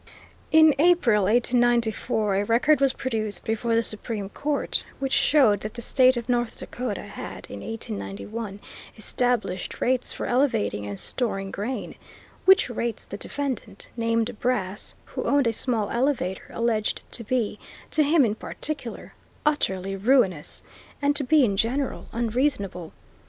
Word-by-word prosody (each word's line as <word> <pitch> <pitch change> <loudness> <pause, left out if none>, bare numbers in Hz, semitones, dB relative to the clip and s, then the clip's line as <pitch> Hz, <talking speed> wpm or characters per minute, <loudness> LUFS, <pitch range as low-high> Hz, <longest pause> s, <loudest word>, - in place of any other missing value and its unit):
In 315 -1 +7
April, 290 - +4
1894, 235 -2 +2
a 200 - +1
record 270 +6 +3
was 275 -1 +4
produced 220 -6 -3
before 225 +1 0
the 230 - +3
Supreme 215 -2 -3
Court 290 +6 -1
which 270 -1 -2
showed 255 -10 +4
that 215 +1 -7
the 235 - -6
State 255 +1 +4
of 235 0 -4
North 240 -2 0
Dakota 245 -4 -4
had - - -8
in - - -6
1891 215 -1 -6 0.4
established 225 -3 -1
rates 255 0 +1
for - - -4
elevating 230 - +1
and 100 -1 -4
storing 195 -6 -1
grain, 235 +6 -4 0.5
which 380 0 +6
rates 235 -2 -3
the - - -7
defendant, 255 -6 -5
named 230 0 0
Brass, 210 -5 -1
who - - -5
owned 280 -1 +3
a 230 - +2
small 225 -2 0
elevator, 235 -7 -1
alleged 230 -2 -1
to 235 - -4
be, 220 -2 -1 0.3
to 310 - +3
him 295 -1 +4
in 210 - 0
particular, 265 +2 -5 0.3
utterly 195 -10 0
ruinous, 195 - +2 0.4
and 285 0 +2
to 285 - +4
be 295 0 +5
in 200 -4 0
general 250 +6 -1
unreasonable. 225 - -1
235 Hz, 140 wpm, -25 LUFS, 210-260 Hz, 0.5 s, In